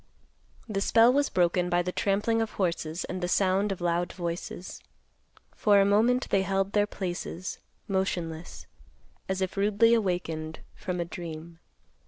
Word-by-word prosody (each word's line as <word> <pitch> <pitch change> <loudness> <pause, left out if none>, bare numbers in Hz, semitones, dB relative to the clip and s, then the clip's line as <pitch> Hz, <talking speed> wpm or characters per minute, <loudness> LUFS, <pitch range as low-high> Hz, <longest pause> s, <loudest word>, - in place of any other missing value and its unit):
The 200 -3 -2
spell 230 +4 +5
was 285 +1 +2
broken 180 0 +2
by 175 0 +2
the 180 - -2
trampling 210 +4 +1
of 225 - -3
horses 170 -2 -2
and 185 0 -5
the 175 - 0
sound 195 +2 +2
of 190 - -4
loud 175 0 0
voices. 175 0 -5 0.7
For 205 -2 +4
a 195 - +5
moment 230 +5 +3
they 195 - +4
held 195 0 0
their 205 0 +3
places, 180 -1 -5 0.3
motionless, 175 -4 -3 0.6
as 190 0 -1
if 190 - -2
rudely 210 +3 +4
awakened 170 -7 -1
from 180 -1 -4
a 170 - -1
dream. 165 -1 -8
185 Hz, 150 wpm, -28 LUFS, 175-205 Hz, 0.7 s, spell